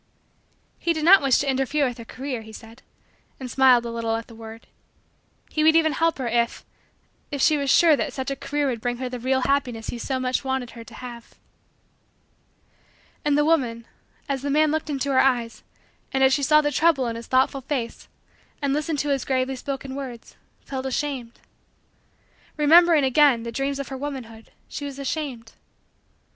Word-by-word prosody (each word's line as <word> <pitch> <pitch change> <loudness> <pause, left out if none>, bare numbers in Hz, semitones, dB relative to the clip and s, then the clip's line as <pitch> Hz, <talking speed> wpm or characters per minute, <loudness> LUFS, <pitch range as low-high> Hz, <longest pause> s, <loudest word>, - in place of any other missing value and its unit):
He 340 - +1
did 315 -1 -3
not 390 +3 +8
wish 270 -3 +3
to 285 - -1
interfere 270 +2 +1
with 245 -1 -6
her 230 - -8
career, 255 -1 -5
he 220 0 -12
said 225 +3 -13 0.6
and 255 -2 -6
smiled 255 -2 +5
a 235 - -4
little 230 -1 -2
at 225 0 -4
the 230 - -15
word. 225 0 -11 0.9
He 310 - 0
would 320 +1 +5
even 320 -1 +4
help 330 +2 +1
her 260 -3 -3
if 235 0 -1 0.6
if 285 - -4
she 305 +3 +4
was 280 -2 -1
sure 325 +2 +6
that - - -2
such 265 0 -4
a - - -2
career 290 +2 -2
would 245 -5 -2
bring 245 0 -2
her 255 0 -4
the 250 0 -6
real 260 +2 0
happiness 250 -5 -1
he 240 - -6
so 260 +2 -2
much 255 +1 -1
wanted 265 -2 -2
her 230 -1 -10
to - - -15
have. 240 -2 -10 1.9
And 290 -1 +2
the 295 - +3
woman, 245 -8 +1 0.4
as 275 -2 -2
the 285 - -3
man 305 +1 +3
looked 315 0 -2
into 280 -1 -1
her 260 - +4
eyes 240 -4 +1 0.5
and 265 0 +1
as 265 0 +5
she 285 - +1
saw 305 +2 +5
the 295 -1 -1
trouble 300 -2 +2
in 230 -1 -3
his 230 0 -8
thoughtful 265 +1 +2
face 255 -3 -4 0.5
and 280 -2 0
listened 300 +1 -1
to - - -1
his 275 -2 0
gravely 265 0 -1
spoken 270 0 -5
words, 260 -4 -8 0.3
felt 265 -1 -5
ashamed. 260 -3 -4 1.2
Remembering, 325 +1 +6
again, 265 -2 +4
the 235 - -5
dreams 275 +3 -2
of 280 - -5
her 265 - -5
womanhood, 255 -6 -7 0.2
she 290 - -7
was 280 -1 -6
ashamed. 270 -5 -4
265 Hz, 190 wpm, -24 LUFS, 240-290 Hz, 1.9 s, not